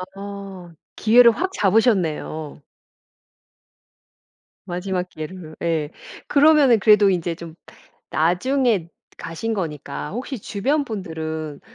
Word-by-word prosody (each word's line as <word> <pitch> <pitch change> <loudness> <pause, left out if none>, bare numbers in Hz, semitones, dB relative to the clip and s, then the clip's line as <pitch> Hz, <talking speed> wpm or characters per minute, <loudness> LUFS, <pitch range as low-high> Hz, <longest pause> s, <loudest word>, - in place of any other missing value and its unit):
아. 195 -3 -9 0.2
기회를 235 +2 +6
확 370 +11 -2
잡으셨네요. 180 - 0 2.1
마지막 180 0 -2
기회를 155 0 -8
예. 160 -3 0 0.4
그러면은 285 -5 +5
그래도 210 0 +5
인제 175 -2 -1
좀 165 -1 -10 0.5
나중에 195 - +1 0.3
가신 220 +8 -4
거니까 150 -6 -5
혹시 250 +4 -5
주변 270 +10 -1
분들은 160 - -5
190 Hz, 215 characters per minute, -22 LUFS, 160-225 Hz, 2.1 s, 기회를